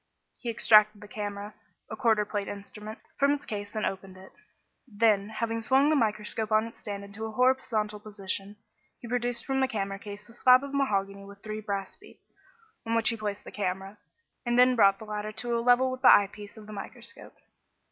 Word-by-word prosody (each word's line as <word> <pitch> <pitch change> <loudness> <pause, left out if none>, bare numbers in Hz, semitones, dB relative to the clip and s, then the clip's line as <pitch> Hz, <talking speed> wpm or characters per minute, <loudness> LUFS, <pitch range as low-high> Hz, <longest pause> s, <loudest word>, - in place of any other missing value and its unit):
He 240 - -5
extracted 215 -2 +5
the 210 - -11
camera 205 0 -5 0.3
a - - -6
quarter 220 -4 +2
plate 205 -1 -3
instrument 210 +2 -8 0.2
from 280 0 +4
its 290 0 -4
case 205 0 -6
and 215 - 0
opened 190 -1 -5
it. 190 0 -14 0.6
Then, 210 -2 +2
having 225 +1 -2
swung 270 +5 +3
the - - +4
microscope 215 -2 -1
on 215 +1 +4
its 230 - -11
stand 200 -2 -6
into 200 +2 -7
a - - -7
horizontal 225 -3 +1
position, 205 -1 -4 0.4
he 240 - -9
produced 245 0 -1
from 270 -1 0
the 265 - +3
camera 195 -5 -3
case 205 0 -9
a 230 - -15
slab 255 +2 +6
of 280 0 -7
mahogany 200 -7 0
with 200 0 -14
three 215 0 -5
brass 200 -2 -4
feet, 415 - -18 0.6
on 230 0 -1
which 230 0 +3
he 230 - 0
placed 210 -2 -4
the - - -10
camera, 195 +1 -4 0.4
and 240 0 0
which 250 0 +6
brought 200 -3 +5
the 220 - -10
latter 210 0 -4
to 240 +2 -2
a 230 - 0
level 250 +2 +4
with 255 0 -6
the - - +8
eye 200 -1 +5
piece 205 +1 -11
of 215 - -11
the 215 - -10
microscope. 195 - -8
215 Hz, 205 wpm, -28 LUFS, 205-235 Hz, 0.6 s, the